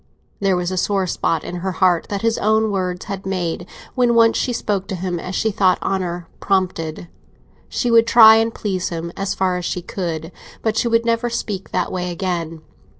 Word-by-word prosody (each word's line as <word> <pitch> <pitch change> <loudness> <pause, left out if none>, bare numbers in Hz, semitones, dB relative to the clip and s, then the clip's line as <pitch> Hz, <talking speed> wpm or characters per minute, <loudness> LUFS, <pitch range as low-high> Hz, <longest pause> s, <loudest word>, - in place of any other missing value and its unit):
There 195 -2 +2
was 180 0 -1
a 185 - -3
sore 195 +1 +1
spot 165 -2 -1
in 180 - -5
her 185 +1 -3
heart 180 -2 +2
that 200 0 -3
his 230 0 +1
own 220 0 +2
words 180 -2 -2
had 195 -1 -5
made 180 -2 -3 0.3
when 245 -2 +2
once 230 -1 +5
she 250 - 0
spoke 200 -4 -2
to 190 - -3
him 180 -1 -3
as 180 +2 -5
she 220 - +1
thought 190 -3 +3
honour 175 -3 -2
prompted; 180 -4 -1 0.6
she 245 - -1
would 230 0 +5
try 220 -1 +8
and 225 +1 +1
please 190 -5 -2
him 170 0 -5
as 195 0 -2
far 185 -1 +1
as 180 - -4
she 180 - -3
could, 165 -3 -4 0.3
but 220 -1 0
she 235 - +1
would 230 0 +2
never 230 +1 +1
speak 205 -4 -4
that - - -1
way 180 -1 -2
again. 170 -3 -3
190 Hz, 205 wpm, -20 LUFS, 180-220 Hz, 0.6 s, try